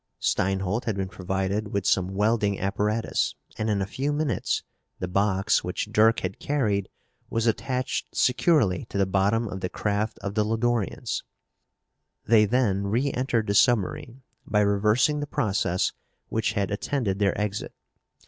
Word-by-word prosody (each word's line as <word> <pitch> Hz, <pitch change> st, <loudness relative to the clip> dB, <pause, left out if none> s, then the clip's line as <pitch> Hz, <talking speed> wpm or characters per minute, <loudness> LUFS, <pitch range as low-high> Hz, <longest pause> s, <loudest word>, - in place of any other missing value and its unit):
Steinholt 95 Hz, +4 st, 0 dB
had 110 Hz, -, -1 dB
been 95 Hz, -1 st, -3 dB
provided 95 Hz, +3 st, -2 dB
with 100 Hz, -2 st, -1 dB
some 95 Hz, 0 st, +1 dB
welding 105 Hz, -1 st, +1 dB
apparatus 105 Hz, +3 st, 0 dB, 0.2 s
and, 110 Hz, -, 0 dB
in 100 Hz, -2 st, +1 dB
a -, -, -2 dB
few 135 Hz, +8 st, -2 dB
minutes, 145 Hz, -8 st, -1 dB, 0.3 s
the 90 Hz, -, -3 dB
box 100 Hz, +2 st, +2 dB
which 90 Hz, +4 st, -3 dB
Dirk 110 Hz, +1 st, +4 dB
had 95 Hz, 0 st, -4 dB
carried 105 Hz, -9 st, 0 dB, 0.4 s
was 115 Hz, 0 st, 0 dB
attached 125 Hz, +3 st, -1 dB
securely 125 Hz, -, +2 dB
to -, -, -6 dB
the 100 Hz, -, +3 dB
bottom 100 Hz, +5 st, +1 dB
of 95 Hz, -2 st, -5 dB
the 90 Hz, -, -3 dB
craft 105 Hz, +2 st, -1 dB
of 100 Hz, -, -3 dB
the 105 Hz, 0 st, +2 dB
Lodorians. 115 Hz, 0 st, -1 dB, 1.0 s
They 110 Hz, -1 st, +5 dB
then 100 Hz, -4 st, +1 dB
reentered 125 Hz, 0 st, 0 dB
the 100 Hz, -, 0 dB
submarine 120 Hz, +3 st, +1 dB, 0.2 s
by 105 Hz, 0 st, +1 dB
reversing 105 Hz, +8 st, +2 dB
the 145 Hz, -, -3 dB
process 95 Hz, -7 st, 0 dB, 0.4 s
which 110 Hz, -1 st, 0 dB
had 100 Hz, 0 st, -1 dB
attended 105 Hz, -2 st, -1 dB
their 100 Hz, -1 st, +1 dB
exit. 105 Hz, 0 st, -3 dB
105 Hz, 150 wpm, -26 LUFS, 95-115 Hz, 1.0 s, They